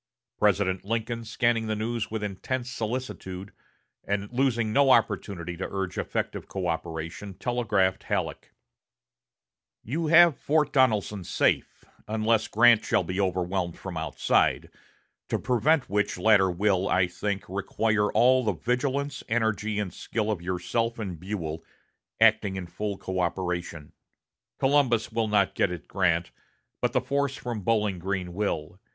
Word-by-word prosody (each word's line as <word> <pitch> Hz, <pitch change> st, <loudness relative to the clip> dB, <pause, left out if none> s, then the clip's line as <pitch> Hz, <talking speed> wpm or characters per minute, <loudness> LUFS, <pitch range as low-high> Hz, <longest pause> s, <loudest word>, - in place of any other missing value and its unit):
President 100 Hz, -3 st, +2 dB
Lincoln, 115 Hz, +2 st, -2 dB
scanning 115 Hz, 0 st, +1 dB
the 110 Hz, -, -1 dB
news 115 Hz, +1 st, -2 dB
with 110 Hz, -1 st, -4 dB
intense 120 Hz, +6 st, -3 dB
solicitude, 110 Hz, -6 st, -5 dB, 0.5 s
and 100 Hz, +1 st, -2 dB
losing 120 Hz, -4 st, +1 dB
no 140 Hz, +3 st, +4 dB
opportunity 100 Hz, -7 st, +1 dB
to 90 Hz, -, -4 dB
urge 95 Hz, -2 st, -3 dB
effective -, -, -3 dB
coöperation, 85 Hz, +1 st, -4 dB
telegraphed 110 Hz, -7 st, +1 dB
Halleck: -, -, -3 dB, 1.3 s
"You 155 Hz, +8 st, -2 dB
have 170 Hz, -1 st, +7 dB
Fort 150 Hz, -1 st, +1 dB
Donelson 105 Hz, -7 st, +2 dB
safe, -, -, 0 dB, 0.2 s
unless 110 Hz, +1 st, +1 dB
Grant 115 Hz, 0 st, +5 dB
shall -, -, +1 dB
be 90 Hz, +3 st, -2 dB
overwhelmed 90 Hz, -1 st, -1 dB
from -, -, -7 dB
outside: -, -, +1 dB, 0.6 s
to -, -, +1 dB
prevent 130 Hz, +5 st, +2 dB
which 105 Hz, 0 st, 0 dB
latter 95 Hz, 0 st, +4 dB
will, 95 Hz, +1 st, +1 dB
I 90 Hz, 0 st, +3 dB
think, 95 Hz, +3 st, -4 dB
require 105 Hz, +2 st, 0 dB
all 130 Hz, +1 st, +4 dB
the 105 Hz, -3 st, +1 dB
vigilance, 130 Hz, -, -1 dB
energy, 110 Hz, -2 st, 0 dB
and 100 Hz, -5 st, -2 dB
skill 110 Hz, -1 st, -2 dB
of 100 Hz, -5 st, -3 dB
yourself 95 Hz, +6 st, -1 dB
and 95 Hz, -7 st, -5 dB
Buell, 85 Hz, -4 st, -4 dB, 0.6 s
acting 110 Hz, -3 st, +4 dB
in 95 Hz, -1 st, -4 dB
full 100 Hz, +4 st, -4 dB
coöperation. 90 Hz, -4 st, -3 dB, 0.7 s
Columbus 135 Hz, -5 st, +2 dB
will 110 Hz, 0 st, 0 dB
not 100 Hz, -2 st, +2 dB
get 100 Hz, -, +1 dB
at 90 Hz, -3 st, -7 dB
Grant, 85 Hz, -3 st, +1 dB, 0.5 s
but -, -, +1 dB
the -, -, +2 dB
force 140 Hz, 0 st, -1 dB
from 120 Hz, -4 st, -4 dB
Bowling 105 Hz, -3 st, +1 dB
Green 90 Hz, -1 st, -3 dB
will. 90 Hz, -3 st, -3 dB
105 Hz, 135 wpm, -27 LUFS, 95-115 Hz, 1.3 s, have